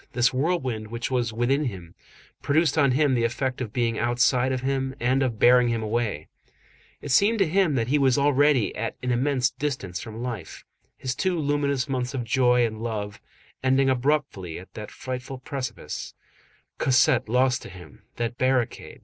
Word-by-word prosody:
This 125 +1 +2
whirlwind 130 -7 -1
which 115 +3 -4
was 120 -3 0
within 125 +6 +1
him, 90 -8 -6 0.5
produced 155 +1 +2
on 140 -5 +3
him 145 0 +3
the 120 -2 +1
effect 125 +3 -2
of 115 -5 -4
being 115 -1 0
outside 125 +2 +2
of 130 -1 -2
him 135 0 -1
and 130 +3 +1
of 125 -4 -1
bearing 125 +2 +5
him 115 -1 -1
away. 110 -8 -2 0.8
It 145 - -4
seemed 210 - +4
to 195 -4 +3
him 175 -3 +2
that 115 -1 0
he 145 +2 +3
was 135 -2 +3
already 145 -5 +3
at 115 +1 -3
an 125 - 0
immense 130 +1 +1
distance 130 -11 -4
from 115 -1 -7
life. 115 -9 -6 0.3
His 130 -1 -3
two 185 +4 -1
luminous 145 -2 0
months 130 -1 -2
of 125 - -2
joy 125 +1 +3
and 110 -1 -5
love, 105 -3 -4 0.4
ending 130 +1 +3
abruptly 130 - -1
at 90 - -12
that 105 -1 -7
frightful 130 +1 -6
precipice, 130 - -6 0.6
Cosette 130 -4 +3
lost 125 +1 +2
to - - -10
him, 90 -5 -13
that 120 +1 -3
barricade, 130 -2 0
M. - - -20
125 Hz, 175 wpm, -25 LUFS, 115-135 Hz, 0.8 s, bearing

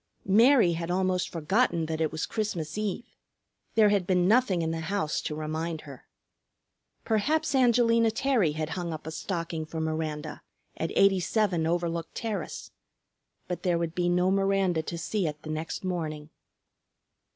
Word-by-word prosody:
Mary 225 0 +5
had 165 +1 -4
almost 185 0 0
forgotten 170 +1 +1
that 160 0 -3
it 155 - +1
was 160 +1 -2
Christmas 185 -8 -3
Eve. 210 +2 -2 0.7
There 215 -2 +6
had 200 -3 +1
been 180 -1 +3
nothing 205 -6 +3
in 160 - -1
the 165 - -3
house 165 -1 -1
to 150 - -4
remind 155 +1 -3
her. 140 -4 -12 1.0
Perhaps 300 +10 +1
Angelina 235 -3 +4
Terry 225 - +1
had 155 0 -3
hung 170 0 -3
up 155 - -8
a 160 - -5
stocking 165 -2 -3
for 160 +1 -6
Miranda 155 -1 -3 0.3
at 165 - -2
87 195 -2 +2
Overlook 170 -1 -1
Terrace. 220 -3 -4 0.8
But 180 - -4
there 175 -2 +1
would 170 -1 -2
be 175 0 0
no 180 +1 +2
Miranda 195 -3 +2
to 170 +2 -5
see 180 +2 -1
it 150 0 -6
the 155 - -5
next 155 +4 -4
morning. 155 -4 -4
175 Hz, 155 wpm, -28 LUFS, 160-200 Hz, 1.0 s, There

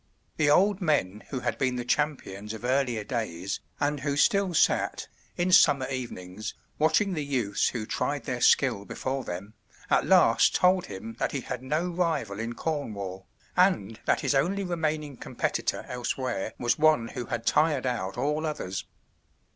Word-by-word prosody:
The 150 -2 +3
old 195 +6 +4
men 110 - +1
who 130 - -3
had - - -2
been 130 -2 +1
the 120 -1 -3
champions 115 -8 -1
of 110 - -8
earlier 125 -4 +1
days, 100 -6 -3 0.2
and 145 0 0
who 140 +1 -2
still 195 +2 +3
sat, - - +2 0.3
in 175 +1 +1
summer 140 -7 +6
evenings, 110 -6 -5 0.2
watching 185 +6 +3
the 155 -3 -2
youths 125 -8 0
who 115 -3 -4
tried 145 +4 -2
their 125 +1 -3
skill 125 -8 +4
before 130 +5 -3
them, 95 +2 -6 0.4
at - - +3
last - - +5
told 180 0 +3
him 110 +3 -8
that - - -1
he 135 - -2
had 125 - -5
no 155 +7 -1
rival 165 - -1
in 115 +1 -3
Cornwall, 100 - -4 0.3
and 170 - +2
that - - +2
his - - +1
only 180 +9 +1
remaining 155 -5 -2
competitor - - -2
elsewhere 125 -3 -3
was 120 +3 0
one 155 -7 +4
who 125 -4 -6
had 115 -1 -3
tired 150 -4 +2
out 115 -6 -2
all 150 +5 0
others. 100 -11 -4
130 Hz, 165 wpm, -27 LUFS, 110-155 Hz, 0.4 s, summer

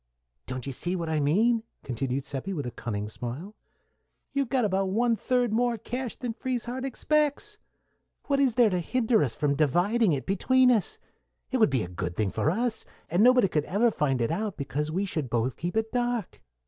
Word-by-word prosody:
"Don't 130 -1 -5
you 140 - -3
see 175 +8 -2
what 170 -3 -3
I 155 -1 +1
mean?" 220 +11 +3 0.2
continued 130 +1 -2
Seppi, 140 +8 -4
with 145 -7 -3
a 120 - -4
cunning 105 -4 -4
smile. 125 - -6 0.8
"You've 275 -3 0
got 255 -4 +2
about 195 -1 +1
one 230 +4 +2
third 245 +1 0
more 240 +1 +2
cash 245 +3 -4
than 245 -3 -4
Frieshardt 250 +1 -3
expects. 305 - 0 0.7
What 280 -1 +1
is 265 -5 +3
there 235 -4 +5
to 180 - +1
hinder 225 +3 +2
us 120 -5 -2
from 145 -1 +1
dividing 175 - +2
it 140 -3 -1
between 255 +6 +4
us? 220 -6 0 0.5
It 260 - +1
would 220 - +5
be 130 -4 +1
a - - -5
good 90 0 -4
thing 105 -1 0
for - - +1
us, 230 +6 0 0.3
and 175 +4 +3
nobody 250 -2 +6
could 150 -4 0
ever 225 +5 +2
find 135 - 0
it 115 - 0
out, 205 +3 -2
because 145 +2 -2
we 190 +5 0
should 155 -8 -3
both 120 +2 0
keep 175 +5 -3
it 220 0 0
dark." 245 -4 -2
195 Hz, 200 wpm, -27 LUFS, -, 0.8 s, nobody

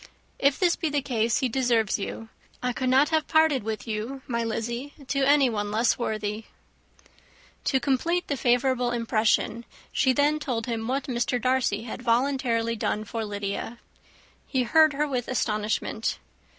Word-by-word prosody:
If 280 0 +3
this 355 -2 +3
be 325 - -2
the 290 -2 -1
case, 230 -3 0
he 260 - +2
deserves 235 -5 +1
you. 225 +2 -6 0.3
I 250 0 0
could 255 +1 -1
not 270 +3 +4
have 315 -1 +1
parted 315 -4 +3
with 220 +1 -5
you, 225 +5 -4
my 235 -2 -1
Lizzy, 235 +5 -4
to 275 - 0
anyone 265 -7 +3
less 225 +3 +2
worthy." 215 -1 -3 1.2
To 265 - +2
complete 330 +8 0
the 285 - -1
favourable 250 0 +2
impression, 230 -1 +1 0.3
she 260 - +3
then 290 +3 +2
told 240 -6 -2
him 225 -2 -3
what 270 +2 -1
Mr. 245 -1 -1
Darcy 250 -4 +1
had 235 +1 -7
voluntarily 240 -2 +1
done 215 -1 -1
for 225 +1 -4
Lydia. 205 +2 -4 0.7
He 260 -2 0
heard 310 +4 +5
her 295 +2 0
with 250 -4 -2
astonishment. 215 -2 -1
245 Hz, 155 wpm, -26 LUFS, 225-275 Hz, 1.2 s, heard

